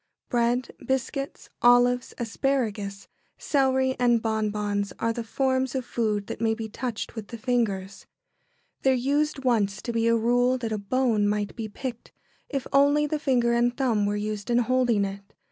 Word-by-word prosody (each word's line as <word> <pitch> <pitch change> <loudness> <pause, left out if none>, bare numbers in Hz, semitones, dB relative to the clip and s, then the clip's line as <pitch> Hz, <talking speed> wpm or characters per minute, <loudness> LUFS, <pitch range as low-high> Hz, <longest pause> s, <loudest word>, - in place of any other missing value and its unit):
] - - -56
Bread, 240 0 +1
biscuits, 265 +1 -3
olives, 245 0 +4
asparagus, 220 -5 -2 0.3
celery, 265 -2 +1
and 240 -1 +4
bonbons 210 -2 -1
are 230 - 0
the 235 - -4
forms 260 +2 0
of 260 -2 -2
food 215 -4 -1
that 210 - -7
may 225 -1 +2
be 225 -1 -5
touched 225 +1 -5
with 220 -3 -7
the 235 - -7
fingers. 215 -5 -2 0.7
There 265 -1 +3
used 280 +2 0
once 205 -6 +2
to 235 - -3
be 230 0 +1
a 230 0 +4
rule 245 +3 +2
that 230 -3 -4
a 215 - -1
bone 220 -1 +1
might 205 -1 -1
be 225 -2 -4
picked, 235 +3 -7 0.4
if 275 -3 -3
only 285 +2 +4
the 300 +1 -2
finger 245 -5 +2
and 240 +1 +1
thumb 225 -7 +1
were 205 - 0
used 210 0 -4
in 240 - +3
holding 245 -4 +2
it. 195 +1 -8
235 Hz, 170 wpm, -26 LUFS, 215-255 Hz, 0.7 s, olives